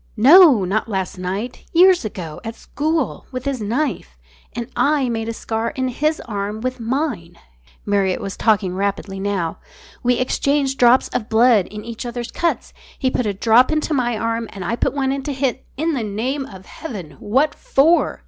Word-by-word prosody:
"No, 275 - +7
not 215 +5 -1
last 190 -2 -3
night. 195 +7 -4
Years 360 0 +6
ago 175 -7 -6
at 225 0 -6
school, 310 +2 -2
with 255 0 -5
his 275 -4 -2
knife. 220 - -2 0.4
And 235 0 -4
I 285 -3 +2
made 225 -1 -2
a - - -1
scar 225 0 -3
in 260 -1 -1
his 305 +5 0
arm 205 -1 -4
with 255 +1 -3
mine." 230 - -3 0.5
Marriott 195 -3 +1
was 195 -1 -5
talking 205 -5 +1
rapidly 195 0 -2
now. 195 -4 -2 0.4
"We 245 0 +2
exchanged 270 +2 0
drops 245 +1 +5
of 225 -3 -3
blood 225 -3 +4
in 210 +1 -9
each 230 -1 -6
other's 240 0 -5
cuts. 340 -1 -2 0.2
He 260 -2 0
put 250 - -1
a 205 - 0
drop 230 +6 +4
into 310 0 0
my 240 -4 0
arm 230 0 -2
and 195 -3 -6
I 230 - -1
put 245 - -1
one 265 -1 0
into 275 +1 -3
his 265 -2 0
" - - -34
"In 320 +3 0
the 265 - -1
name 250 +7 -3
of 190 -2 -12
heaven, 200 - -8
what 270 +9 +1
for?" 320 +6 +2
235 Hz, 185 wpm, -20 LUFS, 205-270 Hz, 0.5 s, No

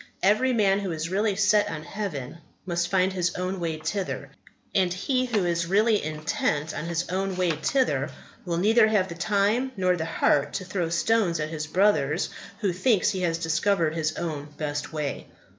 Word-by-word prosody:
Every 215 +7 +4
man 200 -4 +3
who 195 -3 -3
is 160 0 -3
really 205 +1 +1
set 205 +1 +3
on 155 -1 -5
heaven 165 -7 -5 0.3
must 170 -1 0
find 190 0 +2
his 180 -1 -1
own 185 +1 -2
way 165 -2 -2
thither; 180 +5 -3 0.4
and 185 -2 +2
he 255 +8 0
who 215 -6 +1
is 170 -1 0
really 210 +3 +3
intent 155 0 -1
on - - -4
his 170 +1 -2
own 190 +1 -1
way 180 -2 +2
thither 250 - 0 0.3
will 170 -2 -2
neither 220 +5 +5
have 205 -4 +2
the - - -5
time 205 +8 +1
nor 185 -1 +2
the 160 -2 -3
heart 145 -3 +1
to 185 - -3
throw 180 -3 -2
stones 175 0 +1
at 155 0 -2
his 155 -1 -4
brother 160 -5 +2 0.4
who 195 -4 +1
thinks 210 +2 +2
he 190 -2 -3
has 165 -2 +1
discovered 165 0 +1
his 155 -1 -1
own 150 -4 -4
best 145 -1 -3
way. 150 -3 -4
180 Hz, 185 wpm, -26 LUFS, 160-200 Hz, 0.4 s, neither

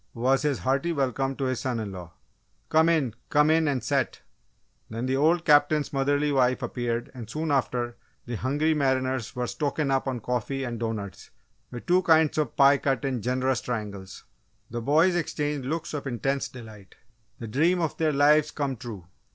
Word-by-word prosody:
was 130 +3 +2
his 145 -3 0
hearty 135 +6 0
welcome 135 -2 -1
to 135 - -4
his 130 -2 -1
son 130 -3 -2
in 105 -3 -4
law. 90 -3 -9 0.6
"Come 160 +1 +4
in 150 -9 +1 0.2
come 150 +1 +4
in 160 0 +3
and 135 -3 -1
set!" - - -1 0.7
Then 115 +3 -4
the 130 +1 0
old 165 +4 +2
Captain's 145 -1 +3
motherly 145 +2 +1
wife 130 -2 +2
appeared 120 -1 -3
and 120 -4 -9
soon 155 +4 -2
after, 120 -3 -1 0.3
the 120 - -6
hungry 145 +7 0
mariners 130 -5 0
were 125 0 -1
"stokin' 145 +2 -2
up" 135 0 0
on 130 -2 -2
coffee 125 +4 -2
and 120 -3 -4
doughnuts, 110 -5 -5 0.4
with 120 - -8
two 180 +1 +4
kinds 160 -3 +3
of 150 -6 -1
pie 140 0 +5
cut 135 -2 -1
in 130 -4 -1
generous 130 +2 0
triangles. 100 -5 -6 0.5
The 120 0 -3
boys 160 +8 +3
exchanged 150 -5 -2
looks 160 +3 -3
of 145 -2 -4
intense 135 +2 -1
delight 110 -6 -13 0.4
the 115 - -7
dream 160 +11 +2
of 165 -3 -1
their 160 -1 +2
lives 150 +1 +4
come 140 -4 -3
true! 105 -6 -8
135 Hz, 180 wpm, -26 LUFS, 120-150 Hz, 0.7 s, pie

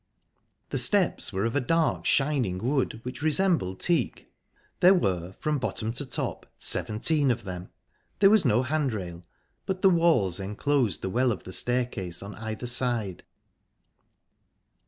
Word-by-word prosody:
The - - 0
steps - - +2
were 95 +3 -1
of 115 - -2
a - - +3
dark, 165 +5 0
shining 135 -10 +1
wood, 125 +1 -1
which 125 +1 -7
resembled 155 - +1
teak; 170 -2 -1 0.5
there 185 +2 +6
were, 95 - -1
from 150 -2 -1
bottom 115 -2 -3
to 140 +3 -4
top, 125 - -4
seventeen 140 +7 +1
of 120 -1 -1
them. 90 -2 -7 0.5
There 195 0 +5
was 215 -4 +5
no 125 -2 +2
handrail, 110 - -3 0.5
but 190 -1 -3
the 195 - +6
walls 160 - +2
enclosed 110 +4 -1
the 95 - -2
well 125 +3 +2
of 105 - -5
the 95 - -8
staircase 120 -9 -1
on 100 +1 -8
either 110 +2 -6
side. 120 -6 -1
125 Hz, 145 wpm, -26 LUFS, 100-150 Hz, 0.5 s, there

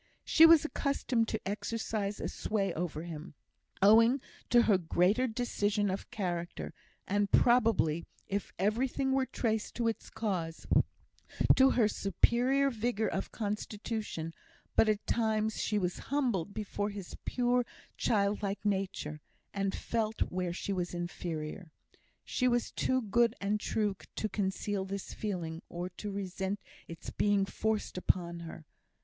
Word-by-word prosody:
She 325 0 +8
was 325 -2 +7
accustomed 270 -6 0
to 220 -3 -3
exercise 210 0 -2
a - - -2
sway 195 -4 -1
over 160 -2 -3
him, 165 -1 -8 0.5
owing 230 +6 +7 0.3
to 240 -1 +6
her 205 -5 +4
greater 185 +8 +2
decision 210 -4 0
of 190 - -5
character, 175 -4 -3 0.3
and, 205 0 +1
probably, 220 -10 +4 0.2
if 200 0 -2
everything 250 +7 +1
were 265 -1 +2
traced 220 -3 -1
to 235 -1 0
its 225 - -2
cause, 175 -7 -3 0.9
to 265 0 +6
her 230 -5 +4
superior 245 +8 +2
vigour 225 -1 0
of 195 - -3
constitution; 210 -5 -3 0.4
but 220 - +5
at 210 -1 0
times 220 -1 +1
she 210 - 0
was 180 -3 -1
humbled 240 - 0
before 205 0 -3
his 200 -3 -7
pure, 245 0 +2 0.3
childlike 200 -1 0
nature, 190 -7 -1 0.3
and 195 -1 -1
felt 225 -1 -2
where 180 -1 0
she 195 +3 -3
was 180 -2 -2
inferior. 170 0 -5 0.5
She 255 - +1
was 240 -1 +1
too 260 -1 +1
good 235 +2 +3
and 205 +1 0
true 210 -1 0 0.2
to 215 - -1
conceal 195 0 -1
this 195 0 -5
feeling, 175 -6 -3
or 175 +1 -4
to 195 +3 -6
resent 195 0 -3 0.3
its 165 - -8
being 205 -1 +2
forced 215 -2 -2
upon 170 -2 0
her. 165 -1 -9
205 Hz, 135 wpm, -32 LUFS, 185-230 Hz, 0.9 s, She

